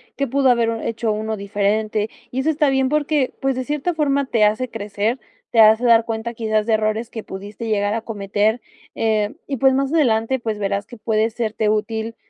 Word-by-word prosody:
que 275 - -1
pudo 270 +1 +2
haber 235 -2 +3 0.2
hecho 230 -1 -1
uno 220 +1 -2
diferente. 210 +2 -1 0.2
Y 255 - -2
eso 290 +4 +1
está 300 -2 +2
bien, 265 -1 +2
porque, 295 -2 0
pues, 270 -1 +1
de 255 - -2
cierta 300 +5 -1
forma 280 -3 +1
te 230 -5 +1
hace 220 +5 0
crecer, 210 +2 -2 0.3
te 230 - +2
hace 220 +2 +6
dar 230 -1 +5
cuenta, 225 +1 -4
quizás 220 -2 0
de 225 - +1
errores 220 +2 0
que 225 -3 -7
pudiste 205 +4 -7
llegar 205 -1 +1
a 225 - -2
cometer, 210 +1 -1 0.3
eh, 215 -2 0
y 275 - -2
pues, 265 +2 +4
más 270 +1 0
adelante, 250 -4 +2
pues 220 -3 -3
verás 200 0 -1
que 240 - -12
puede 220 0 +1
serte 220 -2 -1
útil, 220 +1 -2
225 Hz, 200 wpm, -21 LUFS, 215-260 Hz, 0.3 s, hace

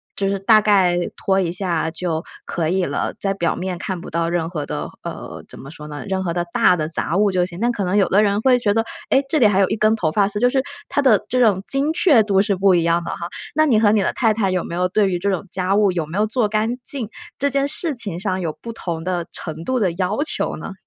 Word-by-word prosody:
就 195 - -1
是 195 0 -1
“大 215 +3 +5
概 190 -4 +3 0.2
拖 190 0 +1
一 175 -3 0
下 175 -3 0
就 165 -1 -3 0.2
可 165 -3 -2
以 185 +1 +1
了”， - - -2
在 195 -1 0
表 170 -3 0
面 185 -1 -4
看 185 +1 -4
不 - - -9
到 165 0 -1
任 170 -1 -1
何 155 -5 -4
的， 75 - -4
呃， - - -7
怎 - - -11
么 135 - -10
说 150 -1 -9
呢， 150 -1 -7
任 190 -1 -1
何 170 -2 -2
的 175 0 -1
大 180 - +4
的 155 -3 -2
杂 165 0 -1
物 205 0 +3
就 180 -1 +1
行。 175 -1 -9
那 240 - +2
可 210 -4 -3
能 180 +2 0
有 200 - +4
的 205 +3 +4
人 205 0 +1
会 255 +1 +4
觉 205 -4 +1
得： 225 +1 +1 0.3
“诶， 270 - +3
这 310 - +1
里 230 - +6
还 200 -2 +2
有 195 - +3
一 - - 0
根 215 +1 +3
头 170 -8 -1
发 200 +4 +2
丝。” 205 0 -3
就 245 - +5
是 265 +1 +1 0.3
它 285 - +1
的 225 -7 +4
这 255 - +1
种 205 -6 +3
精 275 +3 +1
确 305 - +5
度 195 -2 +2
是 200 -1 +1
不 190 +1 +3
一 170 - +2
样 170 +1 +1
的 - - -4
哈， 170 - -5 0.3
那 310 +1 +4
你 230 -6 +4
和 215 -2 +4
你 215 -1 +3
的 - - 0
太 225 -3 +2
太 210 -3 0
有 185 -1 0
没 - - -7
有 180 +1 +1
对 200 +1 +2
于 180 - -1
这 200 +3 0
种 195 0 -2
家 190 +1 +1
务 205 -2 +3
有 170 -3 -2
没 165 +5 -5
有 210 - +3
做 225 0 +1
干 220 +3 0
净， 255 -5 -3 0.3
这 280 - +1
件 275 +1 +1
事 310 +2 -3
情 200 -8 -3
上 190 -1 -2
有 160 -3 -3
不 235 - -6
同 170 -7 -5
的 180 -1 -2
程 160 +1 -7
度 255 +6 0
的 190 -5 +1
要 185 +4 -1
求 - - -1
呢？ - - -7
195 Hz, 300 characters per minute, -20 LUFS, 175-215 Hz, 0.3 s, 里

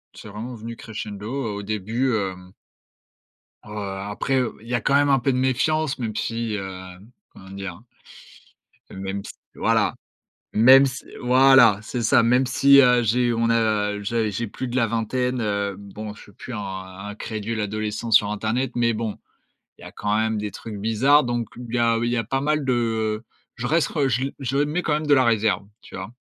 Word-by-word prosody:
C'est 105 - -11
vraiment 115 +4 -7
venu 115 +1 -7
crescendo, 105 -2 -7
heu, 130 -2 -3
au 100 0 -5
début, 110 +5 -1
hem 95 -3 -4 1.1
Heu, 105 - -14
après, 100 +6 -3
heu, 125 - -2
il 115 - -15
y 120 - -4
a 120 - +1
quand 140 - +2
même 145 0 +4
un 135 -2 +4
peu 135 +2 +1
de 125 - -1
méfiance 135 +3 +1
même 110 -3 -3
si, 115 0 -2
hem, 95 +2 -8 0.2
comment 95 0 -14
dire? 95 -1 -7 1.1
Heu, - - -11
même 95 +1 -4
si - - -9 0.2
voilà - - +1 0.6
même 130 +5 +7
si 130 0 -7 0.2
voilà, 125 -4 +6
c'est 120 +2 -4
ça! 115 +1 +4
Même 125 +2 +3
si, 140 +2 +6
heu, 125 -1 +4
j'ai 120 +2 +2
on 115 0 +1
a, 110 -3 +1
heu, 105 - -5
j'ai 110 0 0
j'ai 115 +3 -3
plus 130 +5 -5
de 120 - -5
la 115 -3 +2
vingtaine, 125 +2 -1
heu, 100 -2 -1
bon 105 +1 -8
je - - -14
suis 100 - -17
plus 125 +5 -9
un - - -4
un 95 0 -7
crédule 110 0 -4
adolescent 110 +2 -3
sur 105 -1 +4
internet, 115 +5 -1
mais 115 -1 +2
bon, 110 -1 -4 0.6
il - - -16
y - - -10
a - - -10
quand 105 0 -1
même 110 -1 0
des 105 0 -3
trucs 105 +2 -8
bizarres, 120 +8 +3
donc 120 -1 -2
b 125 - -8
il - - -5
y - - +1
a 115 -1 +3
il 120 - 0
y 125 - 0
a 115 - 0
pas 135 +4 -1
mal 150 0 0
de, 130 - +1
heu, 110 -2 -1 0.3
je 120 - -4
reste 160 +1 +2
re 145 -4 0
je 125 +2 0
le 140 - -3
je 135 -1 -3
mets 150 +5 +1
quand 150 - 0
même 155 +1 -2
de 145 - +3
la 130 -1 +4
réserve, 110 -3 +1 0.2
tu - - -11
vois? 95 +6 -7
115 Hz, 215 wpm, -23 LUFS, 105-125 Hz, 1.1 s, même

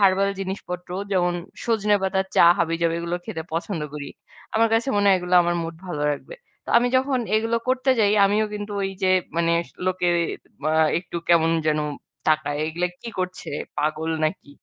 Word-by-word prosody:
Herbal 195 0 +4
জিনিসপত্র 180 -2 -5 0.2
যেমন 175 -1 +2 0.3
সজনে 210 -3 +2
পাতার 190 0 0
চা - - +7 0.2
হাবিজাবি 165 0 +1
এগুলো 170 +1 -2
খেতে 160 - -5
পছন্দ 165 +1 -2
করি। 145 -1 -5 0.5
আমার 225 +1 +4
কাছে 230 +4 +1
মনে 205 0 +2
হয় 195 - +6
এগুলো 180 0 -1
আমার 175 0 0
মুড 165 0 -5
ভালো 150 -5 -3
রাখবে। - - -8 0.3
তো - - -5
আমি 245 - +1
যখন 265 0 +1 0.2
এগুলো 225 +1 +1
করতে 260 +1 +2
যাই 205 -1 +4
আমিও 205 +2 +3
কিন্তু 205 0 -5
ওই 195 - -1
যে 190 - +3 0.3
মানে 170 0 +2 0.3
লোকে 185 -1 +1 0.6
মা 155 - +2 0.3
একটু 170 0 -7
কেমন 165 -1 +5 0.2
যেন 155 0 +2 0.5
তাকায়। 150 -2 +1
এগুলো 170 +3 -1 0.2
কি 235 - -6
করছে? 185 0 -4 0.3
পাগল 155 +2 -1
নাকি? 155 -2 -3
180 Hz, 170 wpm, -23 LUFS, 165-205 Hz, 0.6 s, চা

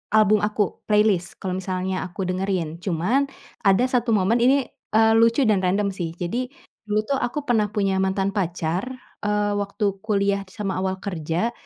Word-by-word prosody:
album 215 -1 +5
aku 210 -2 -1
playlist, 210 -4 +2
kalau 185 -1 -3
misalnya 185 0 -2
aku 185 +2 -5
dengerin. 185 -3 -2
Cuman, 200 - +1 0.4
ada 195 +5 +5
1 250 -2 0
momen 210 +4 +2
ini, 265 +2 +4 0.3
eee, 220 0 +5
lucu 230 +4 +4
dan 210 -3 +3
random 195 +2 +1
sih. 170 -3 -4
Jadi, 235 +9 -2 0.4
dulu 210 0 +1
tuh 275 -1 0
aku 280 +4 -2
pernah 220 -4 +2
punya 195 -2 0
mantan 190 +1 0
pacar, 175 -2 -1 0.4
eee, 210 0 0
waktu 200 +1 -2 0.2
kuliah 200 -2 +1
sama 195 -1 -3
awal 190 0 -1
kerja. 175 +3 -2
200 Hz, 160 wpm, -23 LUFS, 185-220 Hz, 0.4 s, album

